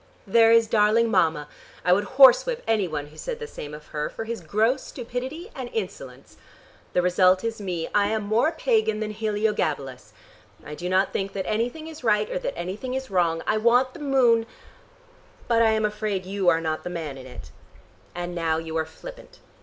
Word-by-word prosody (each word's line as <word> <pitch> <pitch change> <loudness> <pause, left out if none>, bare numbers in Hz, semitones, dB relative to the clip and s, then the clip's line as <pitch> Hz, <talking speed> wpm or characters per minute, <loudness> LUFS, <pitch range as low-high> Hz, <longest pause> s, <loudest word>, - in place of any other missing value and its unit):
There 225 +2 +5
is 230 0 +6
darling 220 +1 +3
Mama! 160 -6 +2 0.4
I 180 - +5
would 205 +3 +1
horse 265 - +8
whip - - -3
any 215 -4 +1
one 150 -3 -4
who - - -16
said - - -4
the 465 - -6
same 150 - -8
of 150 0 -10
her, 150 -1 -3
for - - -6
his 230 -1 -5
gross 220 +10 +1
stupidity 260 - -6
and 255 -3 -6
insolence. 445 - -6 0.6
The 180 - +2
result 185 +1 +3
is 225 -2 -3
me; 175 -4 -3
I 205 -1 +3
am 215 0 -1
more 220 +9 +2
pagan 440 - +1
than 215 -1 -3
Heliogabalus. 205 - -2 0.5
I 150 - -7
do 175 +4 -5
not 190 +1 +2
think 195 0 -2
that 195 -1 -3
anything 240 +8 -2
is 315 -4 -10
right 210 -2 +2
or - - -1
that - - -4
anything 195 +9 -4
is 265 -3 -5
wrong. 170 -3 +1
I 215 - +1
want 245 +4 +3
the - - -11
moon, 250 -6 +3 1.0
but 230 -1 +3
I 225 - +5
am 220 -1 +1
afraid 210 -3 -2
you 190 -1 +1
are 165 - +2
not 155 -1 -3
the - - -4
man 160 -5 -5
in 130 -1 -10
it." 125 - -11 0.6
"And 175 0 -4
now 165 -2 0
you 160 0 -5
are 160 - 0
flippant." - - -12
210 Hz, 200 wpm, -25 LUFS, 175-235 Hz, 1.0 s, horse